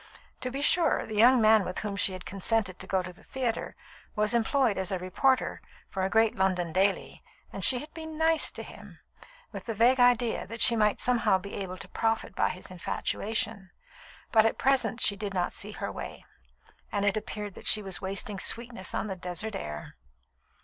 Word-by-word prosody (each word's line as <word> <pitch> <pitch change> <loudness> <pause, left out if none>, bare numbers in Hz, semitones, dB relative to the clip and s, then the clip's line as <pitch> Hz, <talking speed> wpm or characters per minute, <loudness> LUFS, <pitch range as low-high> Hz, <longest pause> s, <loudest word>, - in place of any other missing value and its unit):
To 255 - -3
be 275 +3 -4
sure, 345 +3 +3
the 220 - -7
young 245 +4 +6
man 220 -1 +5
with 180 0 -4
whom 205 -2 -3
she 195 -1 +1
had 185 -1 -8
consented 195 0 -1
to 190 - -6
go 190 -1 0
to 180 0 -8
the - - -15
theatre 250 -4 -3 0.4
was 210 +1 +2
employed 235 -2 +2
as 190 +1 -2
a 190 - 0
reporter 185 +9 +1 0.3
for 190 - -3
a 190 - +1
great 225 +1 +3
London 180 -3 0
daily, 195 +2 0 0.3
and - - -5
she 255 - +5
had 300 +5 -8
been 320 -1 -8
"nice" 320 0 +3
to - - -7
him, - - -12 0.5
with - - -8
the 225 - -3
vague 245 +4 +4
idea 245 -1 +3
that 230 +2 -8
she 235 - +5
might 210 -2 +2
somehow 240 -6 +3
be 200 +2 -9
able 185 -2 -5
to 185 - -10
profit 225 +1 -1
by - - +1
his 185 0 -6
infatuation; 200 +2 -3 0.6
but 220 -1 +6
at 225 - +1
present 255 -4 +2
she 200 - +3
did 200 -1 -5
not 180 -1 0
see 210 +1 -2
her - - -4
way, - - -8 0.7
and 205 -1 0
it 205 - +2
appeared 210 -1 -5
that - - -9
she 215 - +6
was 190 -2 -4
wasting 195 +1 -3
sweetness 230 -5 -1
on - - -1
the 195 -3 -4
desert 180 +4 -5
air. 75 0 -7
210 Hz, 200 wpm, -28 LUFS, 190-235 Hz, 0.7 s, young